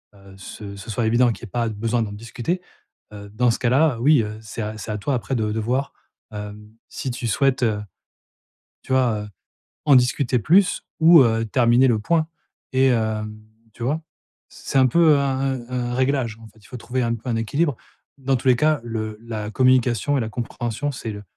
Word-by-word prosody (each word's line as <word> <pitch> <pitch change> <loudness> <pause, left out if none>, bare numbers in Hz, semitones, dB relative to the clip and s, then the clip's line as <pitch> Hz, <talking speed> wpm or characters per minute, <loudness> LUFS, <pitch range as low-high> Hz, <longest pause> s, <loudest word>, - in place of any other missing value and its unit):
heu, 100 -1 -16
ce 100 +1 -9
ce 100 +3 -10
soit 115 +2 -1
évident 120 +1 +3
qu'il 115 - -9
y 120 - -6
ait - - -21
pas 120 -2 -1
besoin 115 +3 -1
d'en 105 - -5
discuter, 120 - -4 0.5
heu, 100 -1 -10
dans 120 +4 +2
ce 115 - -3
cas-là, 130 +1 +2
oui, 145 -1 +5
heu, 105 +1 -6
c'est 110 +1 -6
c'est 110 - -6
à 105 - -2
toi 135 +7 -2
après 125 +2 -2
de 110 -2 0
voir, 125 +5 -1 0.4
heu, 105 0 -6 0.3
si 130 - -5
tu 120 0 -4
souhaites, 130 +3 +1
heu, 110 -3 +1 1.0
tu - - -9
vois, 120 -5 +2
heu, - - -11 0.6
en 140 -3 +7
discuter 125 0 +2
plus 180 - +3 0.2
ou, 165 -1 +8
heu, 115 -1 +1
terminer 120 +1 +4
le 115 -3 +2
point 160 +7 +1 0.4
et 130 0 +4
heu, 110 -2 0 0.5
tu 120 - -10
vois? 150 +5 -1 0.5
C'est 135 - -3
un 130 - +6
peu 155 +2 +5
un 140 - 0 0.4
un 125 -1 -2
un - - -3
réglage 130 -3 0
en 110 - -12
fait, 110 +2 -23
il - - -17
faut 130 - -8
trouver 125 +2 -2
un 115 -1 0
peu 115 +2 -8
un 115 - 0
équilibre. 140 +5 0 0.4
Dans 135 0 0
tous 130 - -2
les 125 - +5
cas 155 +3 +2
le 110 -2 -4
la 110 -2 -5
communication 130 +1 +2
et - - 0
la 110 - -2
compréhension, 120 +3 -3
c'est 115 -4 -6
le 105 0 -8
120 Hz, 205 wpm, -22 LUFS, 110-135 Hz, 1.0 s, ou